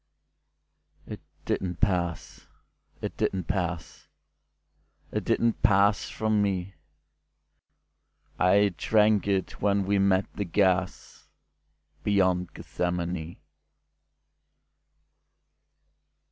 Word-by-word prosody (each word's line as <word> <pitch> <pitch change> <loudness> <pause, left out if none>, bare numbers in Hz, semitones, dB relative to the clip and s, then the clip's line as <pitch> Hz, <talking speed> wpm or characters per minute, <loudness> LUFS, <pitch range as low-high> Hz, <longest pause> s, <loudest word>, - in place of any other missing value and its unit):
It - - -8 0.2
didn't 90 -2 -2
pass—it 85 -6 -4
didn't 95 -1 -1
pass—It 85 -2 -7
didn't 115 -1 +1
pass 100 +1 +3
from 110 -1 0 2.0
me.I 100 +2 +4
drank 105 -2 +3
it 95 -2 -1
when 100 -1 +2
we 100 +1 +1
met 95 0 +3
the 100 - -3
gasBeyond 95 0 -2
Gethsemane. 85 -1 -3
95 Hz, 65 wpm, -27 LUFS, 90-100 Hz, 2.0 s, me.I